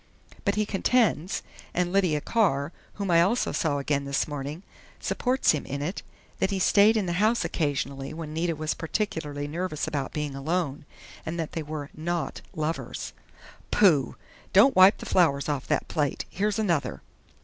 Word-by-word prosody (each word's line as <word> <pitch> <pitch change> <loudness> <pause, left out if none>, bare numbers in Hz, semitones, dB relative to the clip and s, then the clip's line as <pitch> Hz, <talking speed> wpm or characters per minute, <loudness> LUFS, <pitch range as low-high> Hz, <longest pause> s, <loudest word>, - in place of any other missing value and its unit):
But - - +2
he 215 0 +1
contends, 200 -4 +1 0.3
and 180 0 0
Lydia 180 -7 +2
Carr, 165 -10 +1 0.2
whom 200 -3 -2
I 170 0 +6
also 215 +8 +2
saw 150 -4 0
again 140 0 -1
this 140 0 0
morning, 145 +3 -5 0.4
supports 255 +1 +2
him 150 - -1
in 140 +1 -4
it, 175 +7 -3 0.4
that 190 - +2
he 200 - -1
stayed 205 +4 +5
in 210 - 0
the 175 - -1
house 225 +3 +3
occasionally 140 -3 -2
when 155 -1 -6
Nita 165 +1 0
was 155 0 -1
particularly 155 -5 -3
nervous 160 0 -3
about 140 -2 -2
being 150 -2 -3
alone, 145 0 -2 0.4
and 170 +1 -4
that 160 - -3
they 165 - -3
were 150 -1 -6
not 170 +1 -3
lovers." 155 0 -3 0.6
"Pooh!... 155 - +4 0.4
Don't 215 +8 +6
wipe 185 +2 +7
the - - -9
flowers 140 -6 +2
off 145 -3 -2
that - - 0
plate. 145 -4 -1
Here's 205 +2 0
another." 175 -9 0
160 Hz, 165 wpm, -27 LUFS, 145-190 Hz, 0.6 s, wipe